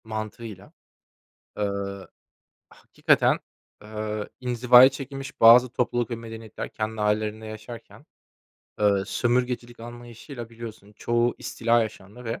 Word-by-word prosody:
Mantığıyla, 110 -2 -7 0.9
eee, 100 -1 0 1.0
hakikaten, - - +2 0.4
eee, 105 0 -5
inzivaya 125 0 +7
çekilmiş 135 0 -8
bazı 120 +3 +8
topluluk 120 0 -1
ve 120 - -2
medeniyetler 115 -1 -8
kendi 110 0 -4
ailelerinde 105 +1 -1
yaşarken, 110 +2 -10 0.7
eee, 100 -2 +3
sömürgecilik 120 -1 -1
anlayışıyla 120 +1 -9
biliyorsun 110 -3 -10
çoğu 120 +3 0
istila 115 0 +1
yaşandı 110 +2 -8
ve, 115 0 -4
115 Hz, 100 wpm, -25 LUFS, 110-120 Hz, 1.0 s, bazı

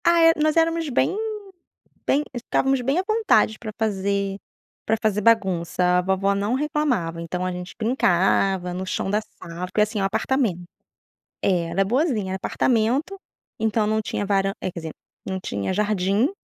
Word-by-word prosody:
Ah, 340 0 +5
é. 330 - +8
Nós 310 -1 +1
éramos 330 -1 +2
bem 270 +8 +1 0.9
bem 290 +2 +2
estávamos 265 +2 0
bem 270 +5 0
à - - 0
vontade 435 - +2
para 215 -2 -6
fazer 200 -2 -1 0.5
para 220 - +2
fazer 215 -2 +1
bagunça, 190 -6 +2
a - - +3
vovó 190 +2 +1
não 200 +3 -1
reclamava 260 - -1
então 180 +2 -3
a 185 - -1
gente 180 0 -7
brincava 195 -5 +2
no 185 +1 -4
chão 190 +1 -2
da 210 - +2
sala, 175 -4 -8
porque, 195 +3 0
assim, 210 0 0
é - - 0
um - - +2
apartamento 210 -2 0 0.8
é, 180 -3 +2
era 185 +4 +1
boazinha. 235 - 0
Era - - -1
apartamento 255 - 0 0.4
então 220 0 +1
não 215 +1 +1
tinha 205 - -3
varan 195 -1 +1
eh, 185 - -2
quer 170 - -7
dizer, 160 -1 -6 0.3
não 190 0 -3
tinha 100 - -3
jardim, 205 +4 +1
205 Hz, 170 wpm, -23 LUFS, 190-250 Hz, 0.9 s, é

